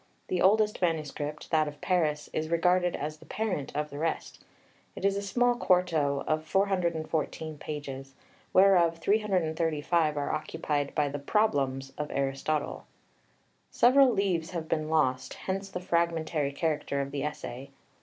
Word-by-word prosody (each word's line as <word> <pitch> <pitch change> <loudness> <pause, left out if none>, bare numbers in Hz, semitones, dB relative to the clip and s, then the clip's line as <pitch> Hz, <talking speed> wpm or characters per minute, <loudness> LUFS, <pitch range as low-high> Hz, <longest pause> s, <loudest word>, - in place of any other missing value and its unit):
The 180 - 0
oldest 210 +2 +3
manuscript, 150 -3 -2
that 155 -2 +3
of 145 0 -8
Paris, 155 -5 0
is 155 0 -2
regarded 180 +1 +2
as 155 +1 -4
the - - -16
parent 205 -11 -2
of 150 0 -2
the 145 - -6
rest. 165 +1 -3 0.5
It - - -4
is 200 0 +3
a 200 - -1
small 245 +5 +2
quarto 170 -10 +1
of 155 0 0
414 160 -4 -1
pages, 135 -3 -6 0.4
whereof 180 -3 +5
335 165 -5 +1
are 145 - -1
occupied 150 -2 -2
by 150 -2 +2
the 145 +1 -4
"Problems" 140 -7 0
of 150 - -2
Aristotle. 140 +2 -2 0.8
Several 260 +2 +5
leaves 190 -6 0
have 165 -3 -4
been 155 -1 -1
lost, 130 -5 +1
hence 195 +1 -4
the - - -4
fragmentary 165 -4 0
character 145 -2 -1
of 140 0 -3
the 140 0 -3
essay. 140 -2 -5
160 Hz, 145 wpm, -29 LUFS, 145-180 Hz, 0.8 s, whereof